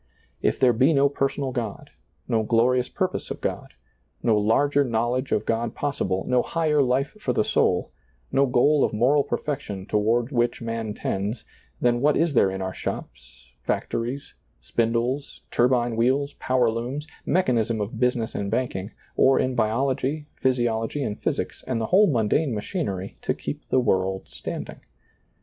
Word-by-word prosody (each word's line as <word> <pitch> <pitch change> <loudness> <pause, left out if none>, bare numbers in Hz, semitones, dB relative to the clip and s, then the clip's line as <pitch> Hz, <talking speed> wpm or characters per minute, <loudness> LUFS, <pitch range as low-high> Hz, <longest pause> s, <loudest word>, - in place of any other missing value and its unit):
If - - +1
there 125 -2 +5
be 130 +8 +4
no 140 0 +4
personal 135 -1 -1
God, 115 -5 -5 0.4
no 115 -1 +2
glorious 120 +3 +2
purpose - - -2
of - - -5
God, - - -4 0.5
no 115 - +4
larger 140 +8 +3
knowledge 120 +2 -1
of 105 - +1
God 115 0 -1
possible, 95 -10 -1
no 125 -1 +3
higher 155 -1 +1
life 135 +4 +1
for - - -1
the 215 - +2
soul, 150 - +1 0.4
no 140 0 +3
goal 135 +4 +4
of - - +1
moral 130 +7 +3
perfection 105 -13 -4
toward 115 +5 +1
which 120 -2 +1
man 115 -2 -4
tends, 105 +4 -3 0.3
then 120 0 +2
what 150 +2 +3
is 165 -2 +2
there 105 -6 +4
in 95 0 -4
our 95 0 -3
shops, - - -7 0.2
factories, 125 +5 -3 0.3
spindles, 120 +4 -1
turbine 120 -1 +2
wheels, 135 +5 +1
power 125 -3 +2
looms, 125 +6 -4 0.2
mechanism 120 -10 +1
of 105 +1 -2
busi 125 +2 +1
ness 115 -2 -3
and 100 -1 -3
banking, 110 -4 -2 0.3
or 135 0 +5
in 130 - +1
biology, 130 +5 0
physiology 120 +1 0
and 105 -4 -4
physics, - - -2
and 125 -3 -1
the 110 - -1
whole 205 +2 +7
mundane 120 +3 +1
machinery, 105 - -4
to - - -1
keep - - -6
the 130 - +3
world 95 -5 0
standing - - -6
120 Hz, 160 wpm, -25 LUFS, 110-135 Hz, 0.5 s, whole